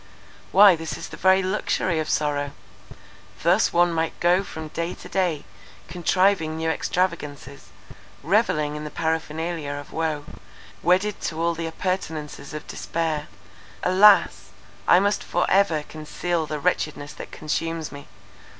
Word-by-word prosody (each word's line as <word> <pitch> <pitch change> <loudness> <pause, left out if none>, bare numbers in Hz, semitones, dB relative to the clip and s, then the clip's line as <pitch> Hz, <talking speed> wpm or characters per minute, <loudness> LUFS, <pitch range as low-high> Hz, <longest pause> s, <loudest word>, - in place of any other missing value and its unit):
Why 195 -1 +8
this 160 0 -5
is - - -7
the - - -8
very 190 +1 +4
luxury 185 -2 0
of 155 - -3
sorrow! 145 -1 0 0.9
thus - - +3
one 175 0 +3
might 165 0 -2
go 175 +1 +4
on 195 - -1
from 160 -2 -7
day 170 +3 -3
to - - -11
day 175 -6 -1 0.4
contriving 180 -2 +1
new 160 0 0
extravagances, 150 -6 -3 0.6
revelling 155 -5 +1
in 150 - -5
the 150 - -5
paraphernalia 160 -1 -2
of 145 0 -9
woe, 155 -3 -2 0.6
wedded 190 +4 +2
to 160 - -3
all 170 +1 +1
the 165 0 -4
appurtenances 160 -3 -4
of 150 -1 -7
despair. 160 -2 -3 0.6
Alas! 195 +3 +5 0.4
I 180 - +7
must 205 +2 +1
for 175 - 0
ever 185 -6 +3
conceal 155 +2 -3
the 150 - -3
wretchedness 150 -3 -1
that - - -9
consumes 165 +1 -3
me. 145 0 -10
165 Hz, 140 wpm, -24 LUFS, 150-180 Hz, 0.9 s, Why